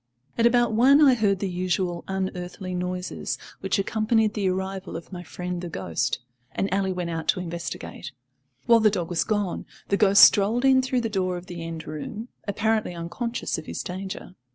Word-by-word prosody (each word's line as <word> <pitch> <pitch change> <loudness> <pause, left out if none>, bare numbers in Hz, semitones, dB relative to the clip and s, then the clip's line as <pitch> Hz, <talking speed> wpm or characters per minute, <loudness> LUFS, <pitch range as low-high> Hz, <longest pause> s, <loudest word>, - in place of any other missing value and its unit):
At 230 - +4
about 240 -1 +3
one 260 +6 +6
I 285 -4 +7
heard 205 -5 +2
the 195 - -2
usual 180 -1 -1
unearthly 185 -1 -4
noises 180 0 -3 0.2
which 195 0 0
accompanied 215 +2 +1
the 200 -4 0
arrival 190 +1 -3
of 165 - -11
my 175 - -5
friend 180 0 -5
the 175 - -5
ghost, 85 - -1 0.4
and 195 -1 -1
Ally 195 -1 +1
went 180 -2 -2
out 160 -1 -4
to - - +2
investigate. 170 -1 -6 0.5
While 235 -2 +6
the 215 -1 +5
dog 180 -4 -3
was 175 - +1
gone, 205 -4 -2 0.2
the 200 - +2
ghost 200 -1 +7
strolled 220 +6 +5
in 265 -1 +6
through 255 -1 0
the 230 - -1
door 185 -4 -1
of 175 - -9
the 175 -3 -7
end 165 -1 -6
room, 215 +10 -6 0.2
apparently 215 -2 0
unconscious 175 +6 -3
of 155 - -11
his - - -4
danger. 190 0 -6
190 Hz, 185 wpm, -25 LUFS, 180-220 Hz, 0.5 s, I